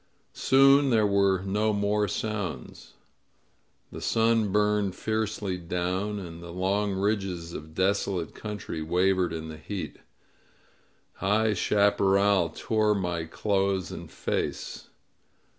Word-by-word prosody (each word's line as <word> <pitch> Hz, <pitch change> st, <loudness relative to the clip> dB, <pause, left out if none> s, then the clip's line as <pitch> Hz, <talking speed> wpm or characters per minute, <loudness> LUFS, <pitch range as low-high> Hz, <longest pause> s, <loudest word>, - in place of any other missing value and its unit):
Soon 135 Hz, +1 st, +5 dB
there 110 Hz, -3 st, +3 dB
were 100 Hz, -2 st, +2 dB
no 105 Hz, +3 st, +1 dB
more 105 Hz, 0 st, +1 dB
sounds. 105 Hz, -5 st, -4 dB, 1.0 s
The -, -, -8 dB
sun 115 Hz, -2 st, +2 dB
burned 105 Hz, -2 st, +1 dB
fiercely 110 Hz, -4 st, -2 dB
down, 90 Hz, +4 st, -2 dB
and 85 Hz, -4 st, -8 dB
the 85 Hz, -, -9 dB
long 95 Hz, +3 st, 0 dB
ridges 95 Hz, -4 st, -2 dB
of 80 Hz, +1 st, -9 dB
desolate 95 Hz, -3 st, 0 dB
country 105 Hz, -6 st, -6 dB
wavered 90 Hz, +2 st, +1 dB
in 80 Hz, -1 st, -5 dB
the 80 Hz, -, -8 dB
heat. 95 Hz, +5 st, -6 dB, 1.2 s
High 105 Hz, +3 st, +2 dB
chaparral 100 Hz, -2 st, +3 dB
tore 110 Hz, +4 st, +1 dB
my 90 Hz, -4 st, -2 dB
clothes 95 Hz, +1 st, -1 dB
and -, -, -8 dB
face. -, -, -3 dB
100 Hz, 110 wpm, -27 LUFS, 90-105 Hz, 1.2 s, Soon